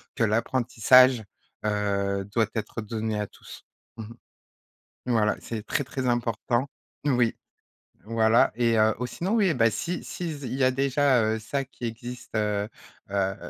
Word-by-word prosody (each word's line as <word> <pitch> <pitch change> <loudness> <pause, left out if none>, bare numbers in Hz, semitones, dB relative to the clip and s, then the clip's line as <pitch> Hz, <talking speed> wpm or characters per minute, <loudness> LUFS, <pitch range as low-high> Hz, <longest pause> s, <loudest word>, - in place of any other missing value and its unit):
que 115 - +1
l'apprentissage, 120 +1 +4 0.4
heu, 100 -1 0
doit 115 -2 +3
être 110 +1 -3
donné 110 0 -3
à 105 - -2
tous, - - -14 0.3
mmh 110 - -6 1.0
mh 125 - 0
voilà, 105 -2 +2
c'est 110 -2 -6
très, 145 - -1
très 130 -1 -3
important 120 +2 0 0.4
oui, 120 -4 +2 0.7
voilà, 115 +1 +3
et 115 -1 +2
heu, 110 0 +4
ou 125 - -1
sinon, 185 - -3
oui, 210 -4 +3
eh 160 - +1
beh, 115 -2 +3
si 175 +10 -3
si 170 -3 -4
z 145 -2 -8
il 125 +1 -4
y 135 - -1
a, 130 - +5
déjà, 135 -1 +2
heu, 110 +1 0
ça 135 +6 -2
qui 125 -2 -7
existe, 120 0 -7
heu 105 -1 0 0.4
heu, 95 -1 0
115 Hz, 165 wpm, -26 LUFS, 110-130 Hz, 1.0 s, a